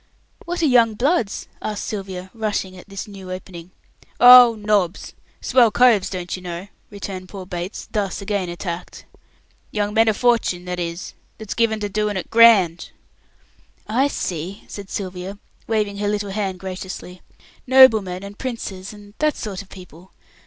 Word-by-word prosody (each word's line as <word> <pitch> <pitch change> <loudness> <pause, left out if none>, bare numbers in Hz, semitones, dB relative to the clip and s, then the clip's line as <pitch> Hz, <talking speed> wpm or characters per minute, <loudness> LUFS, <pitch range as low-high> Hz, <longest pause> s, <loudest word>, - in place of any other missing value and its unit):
"What 350 0 -3
are - - +5
young 235 -5 +4
bloods?" 245 - 0
asked 210 -1 -4
Sylvia, 190 -3 -6
rushing 210 -4 -3
at 185 +2 -14
this 195 +1 -6
"new 195 -3 -10
opening". 180 -2 -8 0.5
"Oh, 245 -1 +9
nobs! 205 -4 0 0.3
Swell 250 -3 +4
coves, 230 -4 +4
don't 180 -2 -4
you 185 - -9
know," 175 +2 -7 0.2
returned 190 -2 -7
poor 195 -2 -8
Bates, 180 +1 -6
thus 200 -3 -2
again 200 -2 -2
attacked. 175 0 -6 0.6
"Young 210 -1 -2
men 225 +1 +4
o' - - +2
fortune 230 -6 +1
that 180 0 -4
is, 170 0 -5 0.2
that's 220 -2 -6
given 225 -2 +1
to 205 - -1
doing 210 0 -1
it 185 - -6
grand." 210 -8 +5 1.0
"I 250 +6 +2
see," 180 - -4
said 200 -2 -9
Sylvia, 185 0 -5 0.3
waving 210 -3 -1
her 205 0 -2
little 205 -1 -2
hand 195 -2 -3
graciously. 185 -1 -7 0.5
"Noblemen 220 -8 +5
and 200 +1 -10
Princes 210 -6 -5
and 205 -1 -14
that 305 -1 +1
sort 200 -3 -5
of 195 - -17
people. 180 -1 -14
200 Hz, 155 wpm, -21 LUFS, 185-220 Hz, 1.0 s, Oh